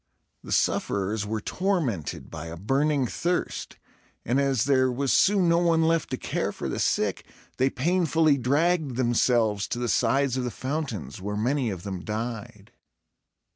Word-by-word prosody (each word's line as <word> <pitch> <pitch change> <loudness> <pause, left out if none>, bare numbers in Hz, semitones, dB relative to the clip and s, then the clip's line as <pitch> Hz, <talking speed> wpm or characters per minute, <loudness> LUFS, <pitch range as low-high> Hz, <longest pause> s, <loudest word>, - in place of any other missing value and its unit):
The - - -9
sufferers 100 +1 0
were 110 0 -2
tormented 155 - -2
by 80 +1 -7
a 80 +1 -7
burning 135 - +1
thirst; 175 +9 -2 0.5
and 130 +5 +2
as 135 -5 +1
there 130 -2 +3
was 135 +2 0
soon 195 -3 +4
no 170 0 +4
one 165 -2 +3
left 165 0 +1
to 130 - -2
care - - -2
for - - -5
the - - -3
sick, - - 0 0.3
they 130 +1 +3
painfully 160 +1 +2
dragged 145 +2 +1
themselves 120 -4 +2
to - - -3
the 120 0 -2
sides 130 +3 +2
of 130 - -1
the 125 - -1
fountains, 120 - -4
where 105 +2 -3
many 125 +3 0
of 90 -4 -6
them 95 -2 -4
died. 110 -1 -5
130 Hz, 160 wpm, -26 LUFS, 110-150 Hz, 0.5 s, soon